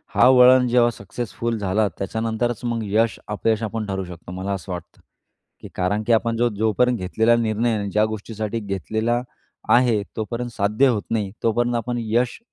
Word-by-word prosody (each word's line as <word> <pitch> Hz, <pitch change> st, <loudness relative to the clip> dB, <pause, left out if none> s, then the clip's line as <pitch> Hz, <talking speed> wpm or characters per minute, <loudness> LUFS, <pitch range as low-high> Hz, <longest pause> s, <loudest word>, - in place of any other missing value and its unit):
हा -, -, +6 dB
वळण 125 Hz, 0 st, +7 dB
जेव्हा 120 Hz, 0 st, +4 dB
सक्सेसफुल 115 Hz, +2 st, -4 dB
झाला, 105 Hz, +1 st, +1 dB
त्याच्यानंतरच 110 Hz, +3 st, -2 dB
मग 115 Hz, -1 st, -1 dB
यश 110 Hz, +3 st, +1 dB
अपयश 110 Hz, +1 st, 0 dB
आपण 110 Hz, 0 st, -3 dB
ठरवू 95 Hz, -1 st, -3 dB
शकतो 90 Hz, 0 st, -10 dB
मला 95 Hz, +2 st, -4 dB
असं 95 Hz, 0 st, -6 dB
वाटतं. 90 Hz, -2 st, -8 dB, 0.6 s
की -, -, -9 dB
कारण 100 Hz, +4 st, 0 dB
की 120 Hz, -, +4 dB
आपण 115 Hz, 0 st, +1 dB
जो 120 Hz, +1 st, +2 dB
जोपर्यंत 115 Hz, +3 st, +2 dB
घेतलेला 110 Hz, +5 st, +2 dB
निर्णय 115 Hz, 0 st, 0 dB
आहे 110 Hz, -2 st, 0 dB
आणि 100 Hz, -1 st, -3 dB
ज्या 105 Hz, +2 st, +3 dB
गोष्टीसाठी 110 Hz, +1 st, -4 dB
घेतलेला 110 Hz, +4 st, -1 dB, 0.5 s
आहे, 120 Hz, -4 st, +4 dB, 0.2 s
तोपर्यंत 120 Hz, +2 st, -3 dB
साध्य 105 Hz, +5 st, +2 dB
होत 110 Hz, -4 st, 0 dB
नाही, 105 Hz, -4 st, -1 dB
तोपर्यंत 120 Hz, +2 st, +1 dB
आपण 120 Hz, +1 st, -2 dB
यश 120 Hz, +2 st, 0 dB
110 Hz, 170 wpm, -22 LUFS, 105-120 Hz, 0.6 s, वळण